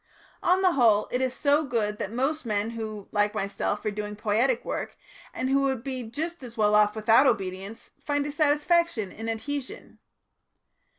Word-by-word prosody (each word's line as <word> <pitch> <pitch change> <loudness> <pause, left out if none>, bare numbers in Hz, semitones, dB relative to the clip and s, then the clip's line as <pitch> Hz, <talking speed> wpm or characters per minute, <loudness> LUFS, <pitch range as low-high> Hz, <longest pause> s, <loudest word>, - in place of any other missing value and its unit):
On 365 +2 +3
the 370 - +5
whole, 225 -8 +4
it 250 - 0
is 260 -1 +1
so 290 +2 +2
good 220 -6 -1
that 205 - -3
most 270 +7 -1
men 215 -1 -1
who, 215 -3 -6
like 210 0 +1
myself, 200 +1 -2
are 215 - +1
doing 210 0 -5
poietic 225 +4 +1
work, - - -4 0.3
and 255 - -3
who 275 +1 +3
would 265 -4 0
be 260 -2 -4
just 305 +9 -4
as 240 -2 -10
well 210 -1 +3
off 210 0 +4
without 225 +5 +5
obedience, 195 -1 -3
find 290 -1 0
a 295 - -3
satisfaction 295 - +1
in 225 +1 -6
adhesion. 260 +5 -5
230 Hz, 175 wpm, -26 LUFS, 210-280 Hz, 0.3 s, the